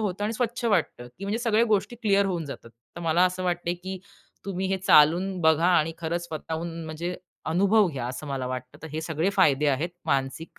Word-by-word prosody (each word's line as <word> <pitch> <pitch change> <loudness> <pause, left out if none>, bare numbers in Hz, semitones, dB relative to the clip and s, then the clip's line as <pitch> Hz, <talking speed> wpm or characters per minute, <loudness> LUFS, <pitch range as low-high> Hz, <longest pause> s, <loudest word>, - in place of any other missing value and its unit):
होतं 205 -1 -2
आणि 215 - -1
स्वच्छ 235 +1 -2
वाटतं, 175 - 0
की 195 - -6
म्हणजे 205 +3 -1
सगळ्या 230 -1 +3
गोष्टी 210 +1 0
क्लिअर 200 -4 +2
होऊन 175 -4 -2
जातात. 130 -4 -9 0.3
तर - - -6
मला 170 +1 +3
असं 185 0 -1
वाटत 175 -1 -1 0.2
की 190 0 -4 0.5
तुम्ही 190 -1 -2
हे 195 - +1
चालून 180 +2 +4
बघा 160 +1 +4
आणि 165 -3 +3
खरंच 170 +1 -2
स्वतःहून 165 +1 -5
म्हणजे 165 +3 -4 0.4
अनुभव 200 +3 +4
घ्या. 130 -6 -4
असं 130 +4 -6
मला 135 -2 -3
वाटतं. 125 0 -6
तर 160 - -7
हे 155 - -2
सगळे 160 +3 -1
फायदे 150 -6 +4
आहेत 145 +5 0 0.2
मानसिक 135 +4 -2
175 Hz, 200 wpm, -26 LUFS, 155-195 Hz, 0.5 s, चालून